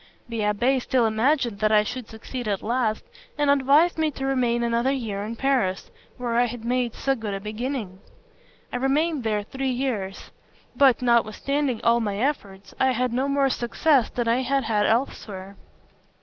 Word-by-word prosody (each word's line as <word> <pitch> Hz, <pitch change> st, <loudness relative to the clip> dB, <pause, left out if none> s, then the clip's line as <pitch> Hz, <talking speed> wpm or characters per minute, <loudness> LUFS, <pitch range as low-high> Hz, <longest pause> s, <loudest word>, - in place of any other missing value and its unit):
The 230 Hz, -1 st, -4 dB
abbé 235 Hz, +6 st, +1 dB
still 245 Hz, -1 st, +1 dB
imagined 230 Hz, 0 st, +1 dB
that 215 Hz, 0 st, +2 dB
I 210 Hz, -1 st, +5 dB
should 245 Hz, +1 st, -6 dB
succeed 235 Hz, +2 st, -7 dB
at 200 Hz, -2 st, -1 dB
last, 230 Hz, -1 st, 0 dB, 0.3 s
and 290 Hz, -1 st, +3 dB
advised 285 Hz, +5 st, +4 dB
me 315 Hz, -1 st, +2 dB
to 270 Hz, -2 st, -5 dB
remain 245 Hz, -3 st, +1 dB
another 235 Hz, +2 st, +1 dB
year 220 Hz, -7 st, -3 dB
in 220 Hz, +2 st, -5 dB
Paris, 235 Hz, -8 st, 0 dB, 0.3 s
where 240 Hz, -2 st, -2 dB
I 245 Hz, -, +4 dB
had 235 Hz, -1 st, -6 dB
made 245 Hz, -1 st, 0 dB
so 270 Hz, -, 0 dB
good 220 Hz, -5 st, -4 dB
a -, -, -4 dB
beginning. 215 Hz, -2 st, -4 dB, 0.7 s
I -, -, 0 dB
remained 285 Hz, +3 st, +1 dB
there 210 Hz, -2 st, 0 dB
three 265 Hz, +5 st, -3 dB
years; 240 Hz, -7 st, -3 dB, 0.4 s
but, 265 Hz, -3 st, +4 dB
notwithstanding 240 Hz, +3 st, +1 dB
all 235 Hz, 0 st, +4 dB
my 205 Hz, -3 st, -2 dB
efforts, 205 Hz, -6 st, -3 dB
I 265 Hz, 0 st, +3 dB
had 250 Hz, 0 st, -1 dB
no 260 Hz, +3 st, 0 dB
more 275 Hz, -1 st, +2 dB
success 250 Hz, +2 st, +2 dB
than 240 Hz, -1 st, -2 dB
I 235 Hz, +3 st, +2 dB
had 270 Hz, +1 st, 0 dB
had 215 Hz, -2 st, +1 dB
elsewhere. 200 Hz, -5 st, -2 dB
240 Hz, 175 wpm, -24 LUFS, 215-270 Hz, 0.7 s, I